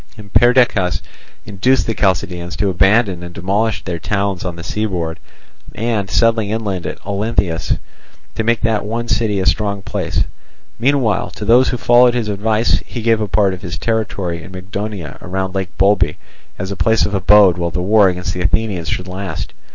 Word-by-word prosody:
And 105 -2 -13
Perdiccas 120 - +3 0.4
induced 110 +6 +1
the 115 - -1
Chalcidians 90 -3 -1
to 100 -2 +1
abandon 95 +1 +3
and 85 -1 -9
demolish 100 +5 -1
their 85 -2 -4
towns 100 0 -1
on 90 -2 -4
the 85 - -8
seaboard 90 -7 -3 0.6
and, 110 -3 -1
settling 115 -2 +2
inland 105 -5 -2
at - - -5
Olynthus, 100 -4 -1 0.6
to 110 - -2
make 115 +1 +1
that 110 -2 +1
one 115 +3 -3
city 110 -4 0
a 95 - -1
strong 100 -2 0
place: 90 -7 -1 0.6
meanwhile 125 -5 +1
to 105 - -6
those 120 +4 +5
who 125 - -1
followed 120 +1 +5
his 115 -3 -1
advice 110 +3 +1
he 120 - -7
gave 115 -1 +2
a 105 - -1
part 100 -1 +2
of 90 - -8
his 90 -2 -5
territory 100 -7 -2
in 95 - -11
Mygdonia 95 -3 -6
round 95 +1 -3
Lake 95 -1 -4
Bolbe 95 -2 +3 0.4
as 95 +2 -4
a - - -3
place 110 +6 +2
of 105 - -3
abode 95 -1 +5
while 85 0 0
the 80 - -3
war 100 +2 +4
against 90 -1 -3
the 90 - -4
Athenians 90 -2 0
should 90 - -3
last. 95 -3 -5
100 Hz, 180 wpm, -17 LUFS, 90-110 Hz, 0.6 s, those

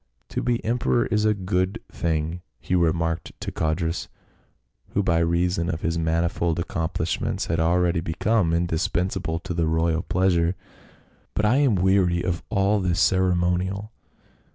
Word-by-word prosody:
"To - - -2
be 120 -1 -1
emperor 120 +1 +1
is 105 0 +1
a 105 0 +3
good 95 0 -1
thing," 80 +1 -2 0.2
he - - -4
remarked 85 -1 0
to - - -4
Codrus, 80 +2 -1 0.9
who 100 - +2
by 85 -3 +2
reason 85 +1 +1
of 80 -2 -3
his 85 0 -1
manifold 85 0 0
accomplish 85 -2 -2
ments - - -1
had 80 0 -1
already 85 +1 +2
become 85 +3 +1
indispensable 85 0 -1
to 90 -1 -5
the 85 -1 0
royal 80 +1 +1
pleasure, 90 -1 +1 0.4
" - - -34
but 105 - +1
I 115 +5 +4
am 140 -7 +3
weary 90 -2 +2
of 90 -2 -1
all 100 +1 +2
this 90 -1 0
ceremonial. 95 +2 +1
90 Hz, 150 wpm, -24 LUFS, 85-95 Hz, 0.9 s, I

